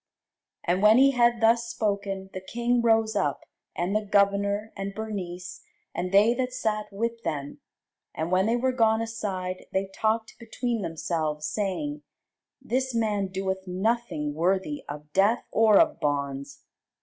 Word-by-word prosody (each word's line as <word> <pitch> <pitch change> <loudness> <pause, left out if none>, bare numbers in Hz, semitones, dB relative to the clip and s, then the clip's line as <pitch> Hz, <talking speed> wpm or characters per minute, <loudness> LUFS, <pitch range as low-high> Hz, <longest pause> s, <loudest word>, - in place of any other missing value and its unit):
And 180 +2 +1
when 215 +2 +7
he 275 +1 +6
had 240 -2 +3
thus 230 +1 +4
spoken, 200 -4 -2
the 185 - -5
king 240 +4 0
rose 225 -1 +3
up, 165 -9 0 0.3
and 180 +4 -1
the 215 - +1
governor, 200 +1 +1
and 195 0 -5
Bernice, 185 -5 -5 0.3
and 180 +1 -3
they 205 +4 +5
that 255 0 -2
sat 215 -4 -2
with 230 +3 -3
them: 145 -7 -4 0.6
and 160 +2 -3
when 185 +2 +3
they 230 - +2
were 260 +2 +1
gone 225 -2 +2
aside, 190 -5 -4
they 190 +1 0
talked 220 +1 -1
between 230 0 -3
themselves, 160 -3 -2
saying, 210 - -2 0.6
This 260 -1 -1
man 210 -3 +1
doeth 190 0 -3
nothing 185 -5 -1
worthy 190 - 0
of 150 +1 -8
death 205 +5 +3
or 220 -2 +5
of - - +3
bonds. 140 -1 -3
205 Hz, 150 wpm, -26 LUFS, 185-230 Hz, 0.6 s, when